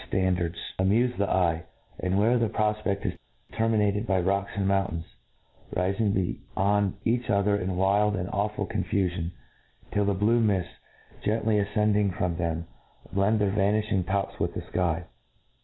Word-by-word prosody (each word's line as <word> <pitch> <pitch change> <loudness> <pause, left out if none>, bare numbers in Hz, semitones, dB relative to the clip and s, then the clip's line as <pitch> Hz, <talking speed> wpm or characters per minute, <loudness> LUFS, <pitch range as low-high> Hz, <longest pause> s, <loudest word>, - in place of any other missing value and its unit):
ftandafds, 90 -2 +1 0.2
amufc 115 +7 +3
the 100 - +1
pye, 85 -3 +1 0.4
and 95 +1 0
where 115 +4 +3
the 115 -2 +1
pro* 105 0 +1
fpeft 100 -2 -3
is - - 0 0.4
terminated 110 -1 +1
by 95 -2 +2
rocks 100 +2 0
and 100 -1 0
mountains, 95 -4 0 0.7
ri 90 +2 +1
fing 105 0 +1
beyond 100 +1 0
each 120 +2 0
other 100 -1 +3
in 95 -2 -2
wild 100 +3 +3
and 90 -2 -2
awful 105 +1 -1
confu 95 -2 0
fion, 85 -2 -3 0.6
till 105 0 +1
the 100 -1 +1
blue 110 +5 +3
mifts, 100 -6 +1 0.5
gently 105 -1 +2
afcending 105 -1 +2
from 90 -2 0
them, 85 -1 -2 0.5
blend 100 +3 +3
their 100 -2 +2
vanilhing 105 -1 +1
tops 100 0 -1
with - - -1
the - - -3
fky. 85 -2 -1
100 Hz, 155 wpm, -27 LUFS, 95-105 Hz, 0.7 s, amufc